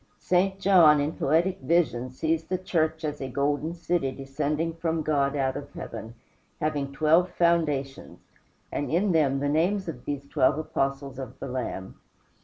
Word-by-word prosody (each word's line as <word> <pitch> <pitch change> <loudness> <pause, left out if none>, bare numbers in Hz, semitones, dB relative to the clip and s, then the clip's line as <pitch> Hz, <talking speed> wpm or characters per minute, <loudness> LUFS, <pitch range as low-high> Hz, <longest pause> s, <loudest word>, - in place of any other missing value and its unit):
St. 190 +2 +1
John, 175 -7 +6
in 145 +2 0
poetic 170 +6 +1
vision, 130 -4 +1
sees 160 +5 -1
the 185 - -1
church 160 -3 -1
as 150 -2 -3
a 135 - -3
golden 145 +5 -1
city 170 -5 -1
descending 145 +4 -2
from 165 -1 -2
God 145 -2 +1
out 135 -2 0
of 145 0 -7
heaven, 115 0 -7 0.4
having 145 -3 -1
twelve 160 +5 +3
foundations, 150 -6 0 0.5
and 145 - -2
in 185 +5 +2
them 140 -5 +2
the 145 - 0
names 175 +6 +1
of 130 -6 -7
these 140 -1 -4
twelve 140 -1 +2
Apostles 135 -3 -2
of 130 0 -7
the - - -5
Lamb. 125 -7 -5
150 Hz, 160 wpm, -26 LUFS, 135-165 Hz, 0.5 s, John